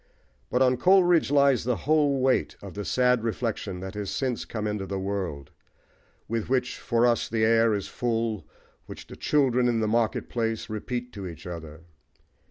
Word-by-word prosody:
But 125 +2 +2
on 125 -1 +3
Coleridge 180 -3 +4
lies 140 -4 +4
the 125 +1 0
whole 145 -3 +3
weight 130 0 +1
of 100 -2 -10
the 105 - -5
sad 125 +1 +2
reflection 110 -5 -3
that 95 +1 -6
has 105 -2 -4
since 130 -3 -2
come 110 -2 -4
into 105 -2 -3
the 100 +1 -3
world, 95 -8 -4 0.8
with 115 0 -3
which 125 -1 0
for 115 0 +1
us 120 -1 +1
the 110 -1 +1
air 115 -1 +4
is 100 - -4
full, 115 -3 -2 0.4
which - - -9
the - - -11
"children 125 -4 +2
in 120 -2 +1
the 110 - 0
market 115 0 0
place" 115 -2 -2
repeat 120 +3 -4
to 100 -3 -6
each 85 -3 -10
other. 80 -2 -8
115 Hz, 180 wpm, -26 LUFS, 105-125 Hz, 0.8 s, Coleridge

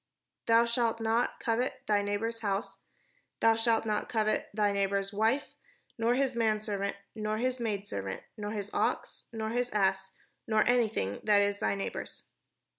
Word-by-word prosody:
"Thou 230 +1 +6
shalt 235 -1 +1
not 225 +1 +1
covet 240 +3 -1
thy 205 -1 +3
neighbour's 210 +3 -2
house, 200 0 -2 0.6
thou 225 - +5
shalt 225 0 +2
not 215 -1 -1
covet 215 -2 0
thy 205 -1 +2
neighbour's 200 0 0
wife, 225 +7 +1 0.4
nor 230 +1 +2
his 265 0 +1
manserv 215 -3 0
ant, 200 - -1 0.2
nor 215 -1 -2
his 255 +2 -1
maidservant, 200 - -3
nor 210 -2 -4
his 210 -1 -4
ox, - - -1
nor 220 -1 -3
his 245 +1 0
ass, 190 -2 +1 0.3
nor 220 -1 +3
anything 220 - +1
that 205 -1 +5
is 200 0 0
thy 105 -1 +1
neighbour's." 100 -1 -4
215 Hz, 155 wpm, -30 LUFS, 200-230 Hz, 0.6 s, Thou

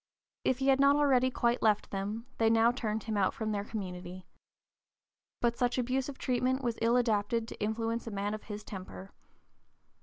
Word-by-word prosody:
If 260 - +2
he 270 +1 +1
had 270 0 +4
not 280 +1 +6
already 265 -3 +4
quite 240 -1 0
left 215 -2 +2
them, 205 +4 -3
they 225 -1 +4
now 225 +1 +5
turned 220 -3 -3
him 220 -1 -3
out 190 -2 +2
from 220 -1 -2
their 200 -1 -1
community. 185 -3 -6 1.2
But 235 -1 +1
such 245 0 +1
abusive 260 +2 -1
treatment 255 +1 0
was 235 -2 -1
ill 230 +2 +4
adapted 230 -1 +1
to - - -10
influence 225 +2 -2
a - - -2
man 200 +1 -2
of 215 - -7
his 210 -1 -6
temper. 190 -1 -9
230 Hz, 180 wpm, -31 LUFS, 210-250 Hz, 1.2 s, not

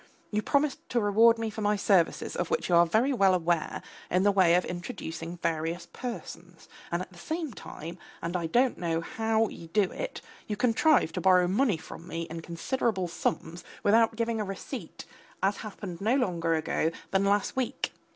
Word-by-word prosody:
You 210 0 +1
promised 280 +4 0
to 245 - +1
reward 225 +2 +5
me 225 -1 -2
for 220 - -6
my 210 0 +2
services, 195 -4 +2
of 175 -1 -2
which - - -1
you 175 - +4
are 170 0 +6
very 235 +10 +2
well 195 -6 +4
aware, 170 -2 0 0.3
in 180 +1 +2
the 205 - +5
way 185 -3 +5
of 180 - +2
introducing 175 -3 -6
various 165 +1 -2
persons, 180 -8 -7 0.2
and 170 +1 0
at 190 - -13
the 175 - -14
same 315 - -3
time, 170 -2 -8 0.2
and 170 +2 -4
I 170 -2 0
don't 245 +8 +2
know 165 -1 0
how 220 +4 +1
you 165 - -10
do 205 +5 +3
it, - - -5 0.3
you 210 - -2
contrive 245 - +3
to - - -3
borrow 180 -1 +5
money 205 0 +2
from 165 +1 -11
me 165 -1 -3
in 165 0 -5
considerable 190 +3 -1
sums 170 0 -3 0.2
without 225 +2 +4
giving 230 -1 -1
a - - 0
receipt, 195 -1 -7 0.4
as 195 +1 +2
happened 195 -4 -7
no 225 +5 +3
longer 170 -10 +1
ago 160 0 0 0.2
than 195 0 +3
last 200 0 +1
week. 260 0 -2
195 Hz, 190 wpm, -28 LUFS, 170-225 Hz, 0.4 s, are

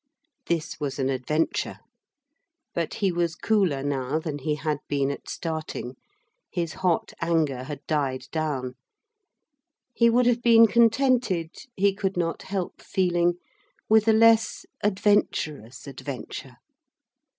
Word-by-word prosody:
This 165 -3 -2
was 145 -3 -3
an 135 -1 0
adventure. 135 +5 -1 1.0
But 170 -2 -2
he 195 -3 +1
was 170 -1 -1
cooler 185 -11 +1
now 135 0 -1
than 155 -2 -4
he 150 +2 -1
had 150 0 -2
been 140 -1 0
at 140 - -8
starting 155 -6 -4 0.5
his 170 -2 -3
hot 180 -3 0
anger 155 -6 0
had 145 0 -7
died 140 -4 -1
down. 145 -6 -2 1.2
He 235 0 +4
would 245 +2 +3
have 240 0 +2
been 230 -1 +7
contented, 230 -6 +2 0.3
he 200 +1 +3
could 195 -2 -2
not 165 -1 -1
help 190 -2 -4
feeling, 175 -2 +1 0.6
with 220 0 +5
a - - +7
less 225 0 +4 0.2
adventurous 185 - 0
adventure. 135 -1 -7
165 Hz, 125 wpm, -25 LUFS, 145-205 Hz, 1.2 s, been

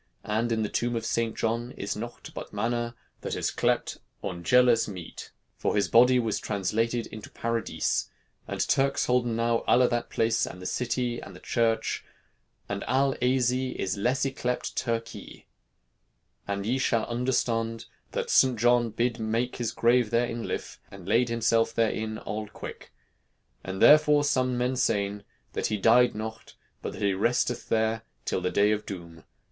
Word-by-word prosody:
And 110 +3 0
in 110 -1 +1
the - - 0
tombe 120 0 -1
of 115 -1 -2
Seynt 115 0 0
John 115 +2 -1
is 100 - -4
noughte 120 +3 -7
but - - -7
manna, 120 0 -2 0.3
that - - -3
is - - -1
clept - - 0 0.2
Aungeles 115 +6 +3
mete. 90 -5 -8 0.3
For - - 0
his 100 - +2
body 125 +2 +6
was 115 -4 0
translated 110 +4 -1
into 110 - -9
Paradys. 115 0 -1 0.4
And - - -1
Turkes 135 0 +2
holden 125 -2 +1
now 115 0 +1
alle 125 0 +5
that 120 0 -2
place 115 0 +1
and 90 - -8
the 90 - -9
citee 120 +1 -1
and - - -10
the - - -11
Chirche. 115 -2 0 0.7
And 100 0 -3
all 135 +2 +2
Asie 125 0 +1
the - - -2 0.2
lesse 130 +5 +1
is 135 - -2
yclept 125 -1 -2
Turkye. 115 -2 -4 1.0
And 100 0 -2
ye 125 +4 0
shalle 115 -3 +1
undrestond, 115 -2 -1 0.3
that - - -2
Seynt 130 -2 +5
Johne 120 0 +4
bid 120 0 0
make 115 +3 -1
his 120 -2 -2
grave 120 0 +3
there 120 +2 +2
in 120 0 -4
his - - -5
Lyf, - - -4
and 95 -2 -12
leyd 120 +3 +3
himself 115 -1 +1
there 115 -1 +3
inne 110 0 -3
all 110 0 -5
quyk. - - -9 0.7
And 95 0 -5
therefore 150 -1 +6
somme 130 -3 +1
men 125 +1 0
seyn, 100 -4 0 0.3
that - - -1
he 105 - -1
dyed 120 +4 +5
noughte, 110 +1 -7 0.3
but - - -5
that - - -6
he 100 -1 +3
resteth 120 +4 0
there 110 0 +1 0.2
till - - -1
the 90 - 0
Day 105 +2 +3
of 105 0 -2
Doom. 85 -4 -8
115 Hz, 175 wpm, -27 LUFS, 110-125 Hz, 1.0 s, body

